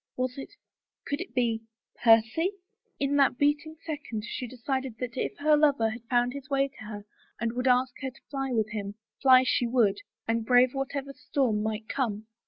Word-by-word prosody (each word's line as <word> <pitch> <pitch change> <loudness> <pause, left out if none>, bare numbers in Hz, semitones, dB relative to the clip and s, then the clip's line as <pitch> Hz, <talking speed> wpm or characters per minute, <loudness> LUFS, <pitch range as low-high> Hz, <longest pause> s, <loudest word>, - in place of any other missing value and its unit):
Was 255 0 -1
it - - -7 0.3
— - - -64
could 285 +3 -2
it 370 - -8
be 230 -3 +1 0.2
— - - -22
Percy? 230 - +4 0.5
In 280 +1 +1
that 275 -3 +4
beating 295 +2 +1
second, 280 -9 -4
she 250 - -4
decided 260 0 -3
that 240 0 -5
if - - -3
her 300 +1 +4
lover 285 -7 +3
had 240 +2 -7
found 245 +1 +1
his 275 -1 -8
way 275 0 +2
to 265 - -13
her 205 -1 -7 0.3
and 230 0 -1
would 250 +1 -1
ask 250 0 +3
her 265 - -2
to 255 - -19
fly 270 -2 -2
with 220 -3 0
him, 205 -1 -4 0.3
fly 260 -1 +7
she 250 -1 +1
would, 230 -5 +2 0.3
and 225 0 +1
brave 250 +2 +5
whatever 275 0 -3
storm 265 -6 0
might 220 0 -3
come. 220 -6 -2
255 Hz, 195 wpm, -28 LUFS, 225-275 Hz, 0.5 s, fly